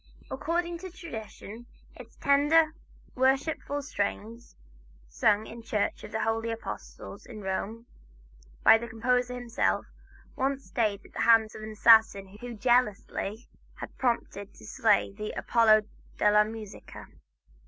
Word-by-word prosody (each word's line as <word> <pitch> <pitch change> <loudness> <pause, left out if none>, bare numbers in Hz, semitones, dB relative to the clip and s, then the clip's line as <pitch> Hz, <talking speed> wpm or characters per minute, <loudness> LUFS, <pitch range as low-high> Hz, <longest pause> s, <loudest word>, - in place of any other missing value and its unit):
According 340 0 -2
to 375 +1 -7
tradition, 240 - -9 0.3
its - - -13
tender, 305 +3 +3 0.4
worshipful 275 +2 0
strains 230 -1 -4 0.5
sung 205 - +2
in 235 - -9
the 225 - -22
church 210 -3 -1
of - - -9
the 220 0 -1
Holy 225 +1 -1
Apostles, 225 0 -8
at 235 - -10
Rome, 210 +3 -4 0.8
by 225 - +7
the 235 - -6
composer 245 +2 0
himself, 245 -1 -1 0.5
once 270 +1 -1
stayed 210 -5 -1
the - - -7
hand 225 -1 +5
of - - -9
an 215 0 -7
assassin 215 -3 +4
whom 240 -2 -7
jealousy 225 -2 0 0.3
had - - -9
prompted 225 -5 -2
to - - -14
slay 220 -5 +2
the 210 +1 -6
"Apollo 215 -2 +4 0.3
della 210 0 +4
Musica." 215 -2 -9
230 Hz, 130 wpm, -28 LUFS, 215-255 Hz, 0.8 s, by